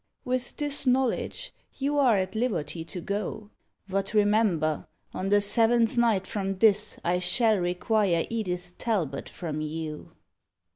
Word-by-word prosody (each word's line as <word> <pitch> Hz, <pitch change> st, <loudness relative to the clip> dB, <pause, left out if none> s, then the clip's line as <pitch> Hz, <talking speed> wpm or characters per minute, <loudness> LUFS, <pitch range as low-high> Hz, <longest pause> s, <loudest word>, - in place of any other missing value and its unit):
With 250 Hz, 0 st, -2 dB
this 290 Hz, -2 st, -1 dB
knowledge, 265 Hz, -, 0 dB, 0.2 s
you 285 Hz, +1 st, 0 dB
are 245 Hz, -7 st, +4 dB
at 190 Hz, 0 st, -2 dB
liberty 200 Hz, -8 st, -2 dB
to 180 Hz, +1 st, -6 dB
go. 205 Hz, +2 st, -4 dB, 0.4 s
But 195 Hz, +2 st, -2 dB
remember, 205 Hz, -8 st, +2 dB, 0.3 s
on 190 Hz, -, -3 dB
the 205 Hz, 0 st, +4 dB
seventh 230 Hz, +2 st, +4 dB
night 225 Hz, -5 st, +2 dB
from 195 Hz, -2 st, -3 dB
this 210 Hz, 0 st, +3 dB
I 175 Hz, +1 st, +1 dB
shall 215 Hz, +3 st, +2 dB
require 180 Hz, 0 st, +1 dB
Edith 180 Hz, -6 st, -4 dB
Talbot 180 Hz, -, -2 dB
from 155 Hz, -3 st, -5 dB
you!" 155 Hz, 0 st, -6 dB
205 Hz, 135 wpm, -27 LUFS, 180-230 Hz, 0.4 s, are